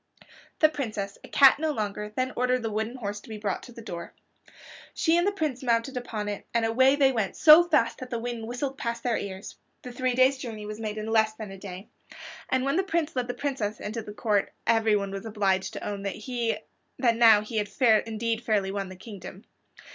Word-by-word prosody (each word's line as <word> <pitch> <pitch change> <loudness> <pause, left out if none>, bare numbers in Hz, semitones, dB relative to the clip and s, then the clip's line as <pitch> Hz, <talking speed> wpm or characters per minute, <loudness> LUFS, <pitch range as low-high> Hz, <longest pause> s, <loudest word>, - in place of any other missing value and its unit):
The 310 - +7
Princess, 215 -9 -4
a - - -10
cat 275 0 +6
no 315 0 0
longer, 210 -5 -3
then 255 0 -1
ordered 250 0 +1
the 225 - -2
wooden 220 +3 -2
horse 205 -4 -4
to 205 - -16
be 220 - -6
brought 205 -2 -2
to 245 - -12
the 230 -1 -11
door. 170 -5 -7 0.8
She 325 0 +2
and 345 +2 +3
the - - +3
Prince 310 -10 -2
mounted 240 +1 0
upon 225 -4 -4
it, 205 -1 -5
and 230 -1 +3
away 260 +4 +4
they 275 -2 +4
went, 220 -6 -1
so 310 +2 +8
fast 295 -9 +1
that 255 - -7
the 240 - -2
wind 230 -1 -4
whistled 265 +3 -4
past 235 0 -3
their 240 -2 +1
ears. 190 -1 -7 0.3
The 250 - -7
three 250 0 -1
day's 260 +1 +4
journey 220 -4 -6
was 210 +1 -6
made 215 -1 -4
in 215 - -4
less 220 -1 +2
than 215 -2 -8
a 195 - -9
day, 190 +1 -9 0.6
and 260 0 +1
when 275 +4 +1
the 380 - +2
Prince 335 -5 -1
led 250 -1 -1
the 245 - -4
Princess 245 -7 -3
into 225 +2 -4
court, 210 -1 0
everyone 215 -3 +2
was 195 0 -5
obliged 195 -2 0
to 200 - -6
own 205 -1 -4
that 225 +4 -3 0.5
now 225 -3 +7
he 215 +1 -5
had 205 -1 0 0.4
indeed 225 +1 -2
fairly 205 -4 +1
won 195 -1 -3
the 185 - -9
kingdom. 195 0 -10
225 Hz, 215 wpm, -27 LUFS, 210-255 Hz, 0.8 s, so